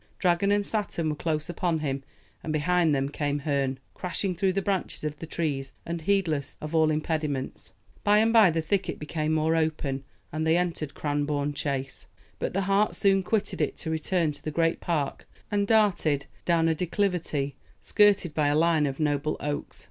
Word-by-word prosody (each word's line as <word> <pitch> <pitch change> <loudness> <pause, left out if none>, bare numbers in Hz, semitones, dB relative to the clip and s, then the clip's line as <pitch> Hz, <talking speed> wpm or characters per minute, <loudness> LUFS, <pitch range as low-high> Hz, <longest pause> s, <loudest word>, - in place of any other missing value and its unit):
Dragon 180 +2 +2
and 205 0 +2
Saturn 200 -7 -1
were 150 - -1
close 155 0 -2
upon 175 -1 0
him, 140 -3 -2 0.4
and 155 - -4
behind 160 0 +2
them 135 0 0
came 145 0 -1
Herne, 140 -3 -1 0.2
crashing 185 +1 -2
through 190 +1 +1
the 195 - 0
branches 190 -5 -1
of 150 -1 -3
the 165 - -7
trees, 140 -5 -2
and 170 0 -4
heedless 160 -6 0
of 155 +1 -6
all 160 -1 +4
impediments. 155 -3 -2 0.3
By 205 0 +5
and 225 +2 +3
by 220 -5 +7
the 165 -1 -1
thicket 195 +5 -1
became 155 +1 -2
more 160 +1 +2
open, 155 -4 -1 0.3
and 155 +1 -1
they 160 +1 +4
entered 165 -5 -2
Cranbourne 145 0 -1
Chase. 140 -2 -3 0.3
But - - -2
the 195 - +2
hart 195 +2 +2
soon 195 -1 +3
quitted 205 +3 -1
it - - -1
to 160 - -3
return 160 0 0
to 145 - -10
the - - -2
great 165 +2 +1
park, 150 -5 -2 0.2
and 200 -1 +1
darted 195 -10 +3 0.2
down 165 -2 +3
a 165 - +3
declivity 170 -5 -1 0.2
skirted 205 -6 +3
by 150 -1 +2
a 145 - +2
line 160 -2 +3
of 135 +1 -4
noble 150 0 0
oaks. 145 0 -4
160 Hz, 185 wpm, -27 LUFS, 145-180 Hz, 0.4 s, by